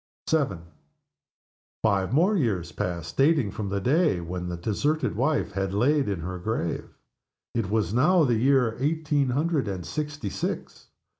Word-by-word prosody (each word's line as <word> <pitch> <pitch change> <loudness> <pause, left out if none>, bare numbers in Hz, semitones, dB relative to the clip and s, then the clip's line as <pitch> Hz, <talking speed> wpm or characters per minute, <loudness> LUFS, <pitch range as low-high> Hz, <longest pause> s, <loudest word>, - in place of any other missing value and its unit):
VII. 140 - +2 1.3
Five 100 -3 +2
years 130 - +2
more - - -22
passed, 85 -1 -6
dating 140 -6 +3
from 105 -2 -4
the 100 0 -1
day 145 - +2
when 90 +1 -5
the 85 - -4
deserted 145 - 0
wife 135 -4 0
was 95 0 -1
laid 140 +4 +2
in 95 -5 -2
her 90 +2 -5
grave. 90 -3 -2 0.6
It 115 -5 -1
was 105 -3 0
now 160 +8 +4
the 125 -5 +2
year 125 -1 +3
eighteen 145 -1 +1
hundred 145 0 0
and 95 -3 -4
sixty 145 - -4
six. - - -4
115 Hz, 150 wpm, -26 LUFS, 95-150 Hz, 1.3 s, now